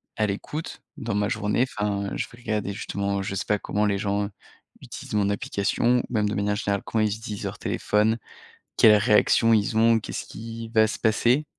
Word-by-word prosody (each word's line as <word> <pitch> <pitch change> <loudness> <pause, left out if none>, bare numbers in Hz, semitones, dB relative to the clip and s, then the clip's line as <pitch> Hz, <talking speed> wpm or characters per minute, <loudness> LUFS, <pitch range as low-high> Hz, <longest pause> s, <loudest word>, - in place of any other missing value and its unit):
à 110 - +1
l'écoute 145 +10 -5 0.2
dans 115 -3 -3
ma 105 0 +1
journée 110 +3 +1
enfin, 100 -1 -1
je - - -2
vais 120 - -15
regarder 105 -4 -2
justement 100 -1 -2
je 95 0 -4
sais 100 - -3
pas, 105 -1 +1
comment 105 +1 -1
les 100 -1 +1
gens 100 0 -1 0.5
utilisent - - -7
mon 100 -1 +2
application 110 +4 +1
ou - - -2
même 105 -2 +1
de - - -2
manière 105 0 0
générale 100 -1 -1
comment 110 -1 0
ils 105 -1 +1
utilisent 110 -3 -6
leur - - -4
téléphone, 110 +2 +1 0.6
quelles 105 -1 +8
réactions 105 +1 +4
ils 105 0 +1
ont, 115 0 +5
qu'est-ce - - -6
qui 115 0 -8
va 110 -1 +4
se - - -4
passer 120 +6 +2
105 Hz, 195 wpm, -25 LUFS, 100-115 Hz, 0.6 s, quelles